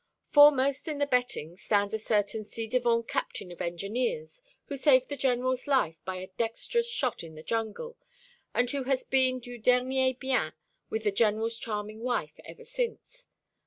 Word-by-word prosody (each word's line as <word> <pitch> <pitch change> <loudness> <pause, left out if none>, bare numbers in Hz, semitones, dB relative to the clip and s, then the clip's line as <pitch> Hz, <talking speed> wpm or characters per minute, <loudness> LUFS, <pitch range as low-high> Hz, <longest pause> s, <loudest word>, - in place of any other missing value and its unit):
Foremost 280 -1 +6
in 305 -2 -2
the 285 - +2
betting 245 - -1
stands 205 +1 0
a 220 - -1
certain 215 0 0
ci 225 +2 -5
devant 235 -1 +1
captain 180 - -3
of 175 - -9
Engineers, 250 - -3 0.2
who 285 - -4
saved 260 -2 +4
the 285 - -2
General's 255 -1 0
life 210 - +1
by 185 +1 -3
a 185 +1 -7
dexterous 465 - 0
shot 265 - -1
in 160 -1 -10
the 155 - -10
jungle, 230 - -3 0.5
and 245 - +1
who 275 -2 -2
has 265 -1 +1
been 260 -1 +2
du 245 0 -9
dernier 260 +2 +3
bien 255 - 0 0.4
with 220 0 -2
the 205 - +2
General's 225 +2 +1
charming 215 -1 -4
wife 245 +1 -2
ever 475 - -11
since. - - -5
245 Hz, 165 wpm, -29 LUFS, 215-270 Hz, 0.5 s, Foremost